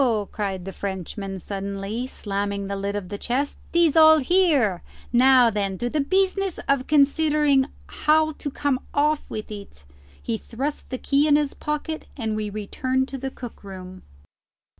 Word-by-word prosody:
cried 195 -4 -3
the 195 - -6
Frenchman 195 0 -5
suddenly, 200 +5 -4
slamming 200 -3 -3
the 200 0 -3
lid 200 +1 -3
of 195 -3 -4
the 205 0 -5
chest. 270 +4 -2
"Tis 335 -3 +3
all 315 0 +8
here! 290 - +3 0.3
Now 250 -1 +6
then 200 -2 -1
to 240 +3 -2
the 305 - 0
business 385 +3 +1
of 275 -2 +1
considering 295 -1 +3 0.2
how 310 +1 +2
to 295 -1 -6
come 275 -1 0 0.2
off 300 +1 +1
with 215 0 -6
it." 200 - -10 0.4
He 225 -2 -3
thrust 275 +6 -4
the 255 - -3
keys 280 +4 +2
in 290 - +5
his 295 -1 +1
pocket, 300 +1 -4
and 220 -4 -2
we 215 -1 -2
returned 255 +6 -2
to 270 - -5
the 270 +1 -3
cook 245 -4 -10
room. 185 -1 -9
255 Hz, 160 wpm, -24 LUFS, 200-295 Hz, 0.4 s, all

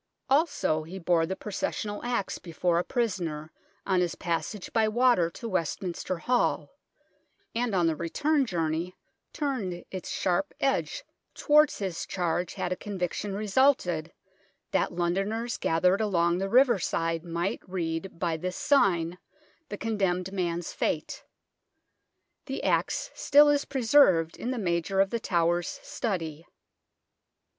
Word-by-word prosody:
Also 275 - +2
he 165 +5 -8
bore 170 -2 +2
the 190 - -2
proces 205 0 -3
sional 205 -1 -4
axe 240 -5 -2
before 170 0 0
a - - 0
prisoner 175 -11 -2 0.3
on 185 -2 +2
his 175 -2 -1
passage 175 +3 -3
by 225 -1 +3
water 235 -6 +3
to 230 +7 -8
Westminster 185 -1 -2
Hall, 245 +8 0 0.8
and 235 -3 0
on 175 -2 +3
the 165 -1 +2
return 280 - 0
journey 170 -1 -2 0.4
turned 220 - -3
its 185 -2 -6
sharp 190 +2 -1
edge 275 - 0 0.3
towards 300 0 +4
his 185 -4 -4
charge 175 -1 -1
had 180 - -3
a - - +1
conviction 195 0 -3
resulted, 200 - +2 0.6
that - - +1
Londoners 195 +7 -1
gathered 180 +5 +2
along 175 -4 +2
the 195 +1 -2
riverside 190 -9 +2
might 170 +2 -2
read 170 -1 -3
by 170 -2 -1
this 180 +3 -4
sign 180 - +2 0.5
the 205 - -5
condemned 190 -4 -1
man's 175 -3 -2
fate. - - -2 1.2
The - - -4
axe - - 0
still 290 +1 +5
is 290 -1 +2
preserved 230 - +4
in 245 - -4
the 255 - -2
Major 180 -1 0
of 195 0 +3
The 235 - -1
Tower's 175 +7 0
study. 175 - -4
185 Hz, 135 wpm, -28 LUFS, 170-225 Hz, 1.2 s, still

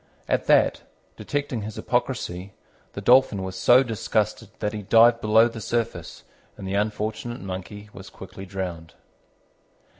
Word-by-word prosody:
At - - 0
that, - - +4 0.3
detecting 145 -5 -3
his 105 +1 -7
hypocrisy, 100 -7 -2 0.4
the 100 - -6
Dolphin 115 -3 +4
was 95 0 -5
so 125 +2 +5
disgusted 110 -2 -2
that 105 -1 -2
he 105 - -4
dived 115 +3 +5
below 110 +2 +5
the 115 -1 -8
surface, 115 +2 -3 0.3
and 95 - -7
the 95 - -3
unfortunate 110 +3 -2
Monkey 100 +2 -7
was 95 0 -11
quickly 95 0 -11
drowned. 90 -4 -6
105 Hz, 140 wpm, -24 LUFS, 95-115 Hz, 0.4 s, so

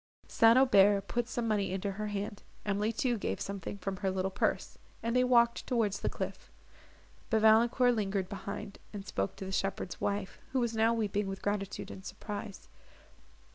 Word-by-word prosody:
St. 230 +1 +5
Aubert 200 -6 +5
put 240 -1 -1
some 240 -2 -2
money 205 -4 +1
into 195 +1 -2
her 210 +2 -4
hand, 205 0 -4 0.2
Emily 210 +2 0
too 240 0 0
gave - - -2
something 200 0 -5
from 195 0 -4
her 195 0 -1
little 190 0 -1
purse, - - -1 0.2
and 230 +1 -1
they 250 - +5
walked 235 -2 +3
towards 220 -5 +1
the - - -1
cliff; - - -6 0.8
but 220 -1 +2
Valancourt 235 +3 +5
lingered 200 -4 -1
behind, 200 0 -6
and 200 -1 -6
spoke 95 - -2
to 195 - -7
the 190 - -5
shepherd's 190 -2 -2
wife, 200 -2 -2
who 265 - +2
was 235 -2 0
now 220 +1 +4
weeping 210 -3 0
with 195 0 -6
gratitude 205 -1 -2
and 190 - -9
surprise. 205 +1 -7
205 Hz, 175 wpm, -31 LUFS, 195-230 Hz, 0.8 s, St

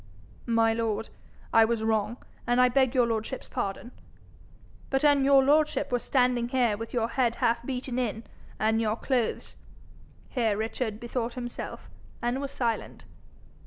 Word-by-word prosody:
'My 225 -1 +3
lord, 225 -1 -2 0.4
I 225 - +7
was 225 0 0
wrong, 220 +1 0 0.3
and 245 +1 +2
I 250 0 +6
beg 260 0 +2
your 250 -2 +5
lordship's 230 +3 -3
pardon. 200 +5 -4 1.0
But 270 +2 +1
an' 285 -2 +5
your 275 0 +6
lordship 300 +1 +2
were 245 - +2
standing 245 -2 +1
here 245 -4 +2
with 225 +2 -7
your 230 -2 0
head 235 -1 +1
half 230 +1 +1
beaten 255 -1 -3
in, 225 -2 -2 0.3
and 220 +1 +1
your 215 -1 +1
clothes 245 -1 -2 0.4
' - - -26 0.3
Here 225 -6 0
Richard 220 0 -3
bethought 235 0 -3
himself, 240 -1 -6 0.3
and 245 +3 -1
was 280 - -3
silent. 235 -5 -3
240 Hz, 155 wpm, -28 LUFS, 225-255 Hz, 1.0 s, I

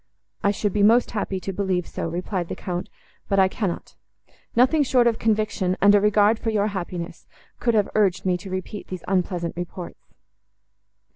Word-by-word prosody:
—"I 200 - +4
should 205 -1 -1
be 210 - +1
most 230 +4 +5
happy 200 -3 -2
to 195 - -4
believe 185 -2 -1
so," - - -4
replied 175 +1 -3
the - - -5
Count, 180 -1 -4 0.4
"but 195 - +2
I 190 -1 +6
cannot. 185 -2 -4 0.6
Nothing 260 +6 +4
short 250 -3 +3
of 230 -2 +2
conviction, 215 -4 0
and 200 +1 +6
a 205 - +5
regard 210 +1 +4
for 225 - -2
your 210 -2 +1
happiness, 180 -3 -6 0.3
could 235 -2 +1
have 210 -2 +3
urged 195 -3 +2
me 185 -1 +2
to 195 +2 -10
repeat 185 +2 -5
these 185 -2 -7
unpleasant 180 -2 -1
reports." 175 0 -7
195 Hz, 175 wpm, -24 LUFS, 180-215 Hz, 0.6 s, I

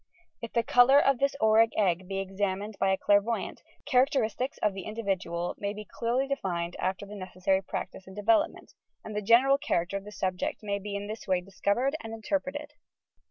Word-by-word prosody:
If 230 - -7
the 235 - +2
colours 265 +5 +6
of 275 -3 +3
this 275 0 +1
auric 220 +1 +4
egg 185 -3 +1
be 195 0 -3
examined 195 +2 -2
by 195 - +2
a 190 - +2
clairvoyant, 205 +4 +1 0.2
characteristics 255 -2 +1
of 210 - +1
the 190 -1 -7
individual 190 -6 -2
may 200 0 -2
be 210 0 -8
clearly 240 +5 -1
defined 175 -11 -2
after 190 +2 -2
the 205 - -10
necessary 190 0 -1
practice 190 0 -6
and 190 - -11
de 205 - -6
velopment, 225 +1 +1 0.3
and 215 - -7
the 210 - -1
general 255 +6 +5
character 175 -5 -1
of 195 - -8
the 210 - -10
subject 185 +1 -3
may 200 -1 -1
in 200 0 -5
thia 215 - -3
way 185 -1 +2
be 180 - -13
discovered 205 +8 0
and 225 0 -6
interpreted. 290 +5 -3
205 Hz, 190 wpm, -29 LUFS, 190-235 Hz, 0.3 s, colours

